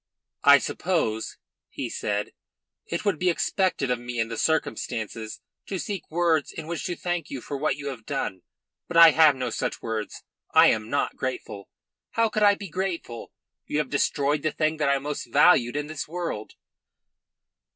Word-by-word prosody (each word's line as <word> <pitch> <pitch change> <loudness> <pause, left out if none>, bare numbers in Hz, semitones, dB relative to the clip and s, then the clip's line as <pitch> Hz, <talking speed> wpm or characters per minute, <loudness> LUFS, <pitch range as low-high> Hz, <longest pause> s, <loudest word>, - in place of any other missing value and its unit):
"I 145 0 +9
suppose," 140 -12 -1 0.3
he - - -4
said, 105 0 -3 0.5
"it 170 +5 -3
would 200 -7 +1
be 185 - +2
expected 175 -6 0
of 125 - 0
me 120 0 -5
in 115 0 0
the 115 - -4
circumstances 115 -7 -2 0.3
to 195 - -3
seek 195 -1 -5
words 165 -2 +1
in 160 - -7
which 165 -3 -4
to 180 -2 -2
thank 175 -3 -3
you 135 - -5
for 140 - -6
what 140 - 0
you 140 0 -5
have 120 -5 -9
done. 135 -10 -3 0.5
But 170 - -2
I 165 -1 +10
have 155 -2 +6
no 125 -2 -3
such - - -2
words. 110 -2 -4 0.3
I - - +8
am 110 0 -2
not 145 - -1
grateful. 125 -6 -5 0.4
How 230 -1 +2
could 215 - -2
I 205 -1 +6
be 200 -1 -8
grateful? 175 -9 -4 0.4
You - - -2
have 150 -3 -1
destroyed 145 0 +1
the 155 - 0
thing 155 +1 0
that 145 -2 +1
I 140 - +3
most 145 +2 -4
valued 130 -8 +5
in 145 0 -1
this 155 0 -5
world." 165 -10 -4
145 Hz, 180 wpm, -26 LUFS, 120-170 Hz, 0.5 s, I